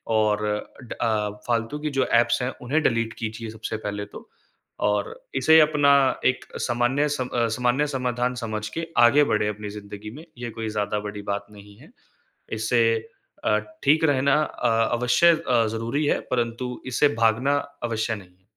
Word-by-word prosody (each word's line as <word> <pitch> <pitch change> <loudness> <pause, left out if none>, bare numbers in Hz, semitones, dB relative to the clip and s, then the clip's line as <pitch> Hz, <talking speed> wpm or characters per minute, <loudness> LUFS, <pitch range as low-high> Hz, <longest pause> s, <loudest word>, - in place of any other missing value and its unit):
और 105 -1 +2
अ, 105 +4 -4
ड 120 - -7
अ, 110 -3 +1 0.2
फालतू 120 +5 -1
की 150 - -2
जो 130 - +3
ऐप्स 120 +1 +2
हैं, 125 - -1
उन्हें 145 +6 0
डिलीट 115 -2 +1
कीजिए 110 0 -5
सबसे 110 0 -5
पहले 105 -1 -4
तो। - - -13 0.6
और 105 -1 -1 0.2
इसे 160 +5 +6
अपना 150 -2 +4 0.3
एक 130 - +1 0.2
सामान्य 125 +4 +1
सम 130 -3 -2
अ, 120 -2 0
सामान्य 125 +4 +1
समाधान 125 -2 -1
समझ 110 -3 -4
के 165 0 -3
आगे 120 +5 +6
बढ़े 105 0 +1
अपनी 105 0 -4
ज़िंदगी 105 +1 -8
में, 155 +6 -11
ये 120 -1 -5
कोई 110 0 -4
ज़्यादा 105 0 -1
बड़ी 105 0 -6
बात 100 0 -3
नहीं 100 0 -14
है। - - -17 0.6
इससे 110 +2 +1 0.6
अ, - - +3 0.3
ठीक 155 +2 +4
रहना 140 -2 +3
अ, - - -2 0.2
अवश्य 125 +8 +4 0.2
अ, 115 -3 +3
ज़रूरी 115 +7 -1
है, - - +1
परंतु 120 +1 -2
इससे 135 +3 +3
भागना 125 +6 +3 0.3
अवश्य 115 -1 -1
नहीं 95 -3 -13
है। 95 - -36
115 Hz, 170 wpm, -24 LUFS, 110-130 Hz, 0.6 s, इसे